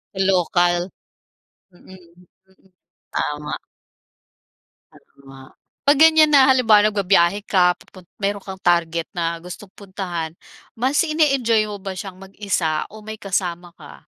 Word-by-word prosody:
Lokal. 175 -1 +1 0.8
Mm, 180 +1 -17
mm. 185 +2 -22 0.4
Tama. 150 0 -3 1.3
Tama. 135 -1 -17 0.4
'Pag 285 0 +5
ganyan 315 -1 +6
na 270 -2 +6
halimbawa 215 -5 +4
nagbabiyahe 195 -2 +2
ka, 180 -2 +4
pupun 185 -2 -17 0.2
meron 200 0 -2
kang 190 -1 -9
target 170 -2 0
na 170 -1 -2
gustong 180 +3 -11
puntahan. 180 -5 -6 0.4
Mas 260 +5 0
ini-enjoy 275 -8 +2
mo 205 -1 -7
ba 190 -1 -6
siyang 190 -1 -8
mag-isa 190 -5 -2
o 215 - -11
may 215 +1 -8
kasama 180 -4 -3
ka? - - -14
190 Hz, 120 wpm, -21 LUFS, 175-210 Hz, 1.3 s, ganyan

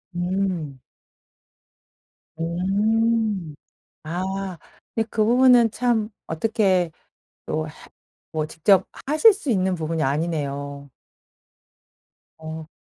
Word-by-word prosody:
음. 175 -6 -2 1.6
음. 200 +1 0 0.5
아 185 +2 -3 0.4
근데 225 -1 0
그 215 - +2
부분은 245 0 +6
참 230 -2 0 0.2
어떻게 185 -1 +1 0.6
또 155 0 -2
해 - - -9 0.6
뭐 155 -1 0
직접 185 +4 +3 0.2
하실 310 +11 +6
수 380 - -3
있는 190 -3 +1
부분이 160 -1 -2
아니네요. 140 -1 -2 1.5
어. 160 0 -7
185 Hz, 145 characters per minute, -23 LUFS, 160-220 Hz, 1.6 s, 부분은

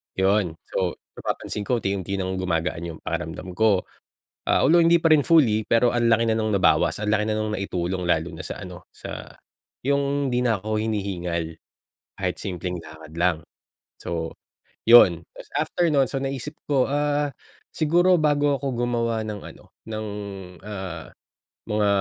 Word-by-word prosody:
Yun 95 -3 +2
so 90 -2 -1 0.3
napapansin 105 - -3
ko 125 - +2
unti-unti 100 -1 -2
ng 95 0 -2
gumagaan 85 -1 -1
yung 80 - -8
pakiramdam 80 +3 -4
ko. 105 -2 +3 0.6
Ah, - - +3
although 170 +5 +6
hindi 170 +1 +5
pa 165 - +3
rin 145 - +4
fully 120 -10 +5
pero 115 +1 +4
ang 120 -1 +2
laki 115 0 +4
na 110 - +3
ng 110 -1 0
nabawas, 95 - +3
ang 105 - -2
laki 105 0 +3
na 110 - 0
nung 110 0 -1
na-itulong 90 -1 -2
lalo 85 0 +1
na 80 - -7
sa - - -6
ano, 90 -1 -10
sa - - -8 0.5
yung 140 0 +1
di 125 - +2
na 115 -3 +2
ako 110 0 -1
hinihingal, 90 -6 -2 0.7
kahit - - -1
simpleng 90 -1 -4
lakad 80 0 -12
lang, 85 -2 +3 0.6
so, 80 -1 -3 0.6
yun. 95 -8 +8
Tas - - -11
after 175 - 0
nun 140 -2 +4
so - - -4
naisip 135 +1 -4 0.2
ko 135 -3 +3
ah, 145 0 0 0.4
siguro 175 +4 +4
bago 145 -1 +3
ako 140 - -4 0.2
gumawa 115 -2 0
ng 105 -2 -5
ano, - - -16 0.2
ng 110 -1 -4 0.6
ah, 95 -5 -6 0.6
mga 105 -1 +2
105 Hz, 160 wpm, -24 LUFS, 90-135 Hz, 0.7 s, yun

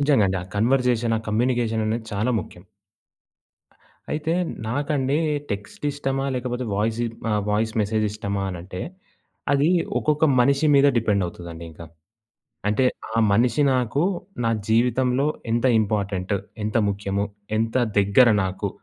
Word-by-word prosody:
నిజంగా 140 -8 +4
అండి. 95 0 -1
ఆ - - -8
కన్వర్జేషన్, 120 0 +2
ఆ - - -6
కమ్యూనికేషన్ 115 0 +1
అనేది 110 +1 -2
చాలా 110 +5 0
ముఖ్యం. 90 0 -12 1.5
అయితే 155 +2 -1 0.3
నాకండి 140 +2 0 0.3
టెక్స్ట్ 100 +6 -6
ఇష్టమా 135 -1 -2
లేకపోతే 125 0 -3
వాయిసి 110 +3 0 0.3
ఆ! - - +2 0.2
వాయిస్ 110 +1 0
మెసేజ్ 110 +1 0
ఇష్టమా 100 -2 -3
అనంటే, 90 0 -7 0.7
అది 140 +3 +3 0.3
ఒక్కొక్క 150 +1 +2
మనిషి 140 +5 +3
మీద 140 +1 +6
డిపెండ్ 105 -4 +1
అవుతుందండింక. 85 -2 -9 0.9
అంటే, 105 +5 +2 0.3
ఆ 115 - +1
మనిషి 120 +7 +2
నాకు 125 +3 +1 0.4
నా 115 - +2 0.2
జీవితంలో 125 +4 +2 0.2
ఎంత 120 +2 +1 0.2
ఇంపార్టెంట్, 100 -2 -1 0.3
ఎంత 110 +2 0
ముఖ్యము, 100 0 -2 0.3
ఎంత 115 +1 -1 0.2
దగ్గర 100 +5 +5 0.2
నాకు 95 0 -2
115 Hz, 125 wpm, -23 LUFS, 100-130 Hz, 1.5 s, మీద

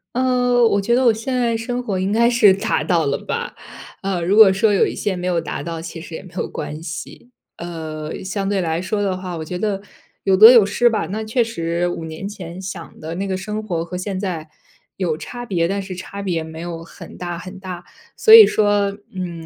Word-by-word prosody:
呃， 245 -1 +3
我 200 -3 +3
觉 235 +5 +1
得 260 - +2
我 235 - +7
现 225 +4 -3
在 235 -2 +1
生 245 +2 -3
活 195 -5 -2
应 190 +1 0
该 235 +3 +3
是 220 -5 +6
达 210 +3 -1
到 170 -5 +2
了 140 - 0
吧， - - -4 0.5
呃， 190 -3 -2
如 195 +5 +2
果 215 -3 +9
说 205 +2 +2
有 195 - +4
一 - - -5
些 205 - -1
没 180 0 -4
有 175 -2 +1
达 155 - -5
到 165 +1 -5
其 165 0 -7
实 165 0 -9
也 - - -8
没 185 - -14
有 - - -1
关 150 +2 -6
系。 165 +9 -8 0.3
呃， 160 -2 -6
相 195 +1 -3
对 200 -2 0
来 165 0 -1
说 205 +2 -2
的 190 -2 -1
话， 185 -2 -6
我 160 - -5
觉 180 +3 -5
得 200 -2 -1 0.4
有 190 -1 +3
得 220 +4 +11
有 230 -5 +7
失 240 +4 +3
吧。 220 -7 -1
那 215 +4 -4
确 235 +2 +1
实 170 -5 -2
5 165 -2 -5
年 160 +5 -6
前 180 -2 -8
想 185 -3 -8
的 160 +2 -5
那 195 +2 -3
个 190 - -1
生 210 +3 -4
活 175 -6 -3
和 180 +2 -6
现 190 +1 -4
在 165 -6 -4 0.5
有 170 -5 -1
差 240 +9 -7
别， 175 -6 0
但 200 +1 -2
是 190 -1 -7
差 200 +2 -7
别 170 -5 -2
没 160 0 -9
有 170 -1 -6
很 - - -12
大 175 -1 -5
很 185 +2 -9
大。 180 -2 -7 0.3
所 440 - +6
以 445 -2 +12
说， 205 -1 +1 0.2
嗯， 175 -3 -5
190 Hz, 245 characters per minute, -20 LUFS, 170-215 Hz, 0.5 s, 以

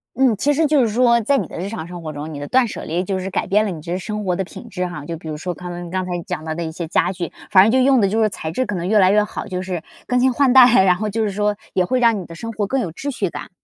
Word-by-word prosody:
嗯， 255 -3 +3
其 290 +6 +2
实 320 +3 +2
就 290 -2 +3
是 235 - +3
说 235 -1 +4
在 275 +6 +2
你 - - -2
的 - - -9
日 195 +3 -3
常 170 -7 -6
生 175 -1 -8
活 155 -2 -5
中， 150 +2 -7
你 145 - -6
的 145 - -6
断 255 -2 +3
舍 - - -7
离 170 +3 -2
就 190 0 -2
是 190 - -4
改 195 - -1
变 210 +2 +3
了 205 - -2
你 160 -3 -7
这 175 +3 -3
生 210 +2 -5
活 180 -2 +1
的 190 - -1
品 - - -11
质 180 -1 -3
哈。 150 -5 -7
就 165 - -4
比 160 - -9
如 150 - -4
说 180 +3 -4
刚 180 +1 -8 0.2
刚 185 0 -1
才 180 - -6
讲 155 - -4
到 160 - -3
的 170 - -3
一 160 - -4
些 165 0 -5
家 180 - +1
具， 175 -3 -5 0.2
反 185 -1 +8
正 220 - +3
就 260 - +3
用 265 -3 +4
的 195 - +3
就 220 +3 0
是 215 - +3
材 160 -5 -5
质 255 +10 -1
可 210 -3 -3
能 175 0 -3
越 215 +1 +3
来 190 -1 +5
越 210 0 +4
好， - - -6
就 185 -1 -3
是 185 -3 -4 0.3
更 250 0 +2
新 255 0 +3
换 275 0 +3
代。 245 -6 +7
然 180 -1 +4
后 215 +2 -3
就 220 +2 -1
是 205 - -1
说 205 +1 0 0.2
也 185 -1 +2
会 255 +6 0
让 230 -4 +3
你 180 - -7
的 165 - -11
生 230 +6 -6
活 210 -2 -2
更 265 +1 0
有 180 - -3
秩 280 - -5
序 195 - -1
感。 150 -2 -8
195 Hz, 370 characters per minute, -20 LUFS, 175-230 Hz, 0.3 s, 反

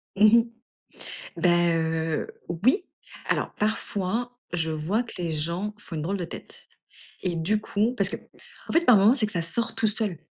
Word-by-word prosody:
Mmh 205 - +6
mh. 230 - +5 0.9
Bah 180 - +3 0.2
heu, 160 -1 0 0.2
oui, 185 - +3 0.5
alors - - 0
parfois, 220 +3 -2
je 165 -2 0
vois 160 +9 0
que 240 - -9
les 170 -2 -2
gens 170 +7 -1
font 170 -5 -8
une 155 - -2
drôle 190 +6 -1
de 180 - -3
tête, - - -9 0.6
et 180 -2 -1
du 180 +6 +1
coup 215 +2 0
parce 200 -4 +3
qu'en - - -4 0.5
fait, 335 +1 +3
par 245 -4 +8
moment, 205 +6 +6
c'est 235 -6 +2
que 215 - -4
ça 170 - 0
sort 230 +7 0
tout 225 - +2
seul. 210 -4 0
200 Hz, 180 wpm, -26 LUFS, 165-220 Hz, 0.9 s, par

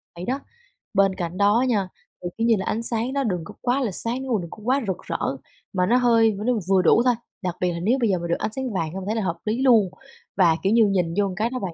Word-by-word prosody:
vậy 175 - -6
đó. 265 +3 -1 0.5
Bên 195 -1 +3
cạnh 175 +1 -4
đó 205 +5 +3
nha, 200 -5 0 0.3
thì, 175 - -2
kiểu 230 +1 +1
như 230 - +5
là, 190 - -3
ánh 230 +2 -2
sáng 235 +3 -2
nó 280 -1 0
đừng 180 -7 -2
có - - -10
quá 255 +2 +1
là 225 -6 -1
sáng, 235 +7 -3
nếu 260 - -5
mà 205 - +1
đừng 170 - -7
có - - -10
quá 265 +4 +1
rực 190 - -1
rỡ, - - -3 0.6
mà 180 -1 +2
nó 240 +5 +3
hơi 230 -3 +4
nó 250 - +3 0.2
vừa 190 -1 +4
đủ 225 - +5
thôi. 250 - +5 0.3
Đặc 180 -2 -3
biệt 180 -1 +1
là 170 - -4
nếu 230 +9 +2
bây 230 - +2
giờ 185 -2 +1
mà 170 - -4
được 170 - +1
ánh 215 - -2
sáng 260 -4 -3
vàng 165 -3 -2
hông 190 0 -5
thấy 215 +2 -1
là 220 - 0
hợp 170 -2 -2
lý 225 +5 -1
luôn. 225 -8 +5 0.5
Và, 170 -4 +5
kiểu 195 +3 +2
như, 230 -2 +5
nhìn 180 -4 0
vô 195 -2 +1
cái 220 +3 0
đó 255 0 -4
bạn, 185 -4 -4
210 Hz, 290 wpm, -23 LUFS, 185-240 Hz, 0.6 s, như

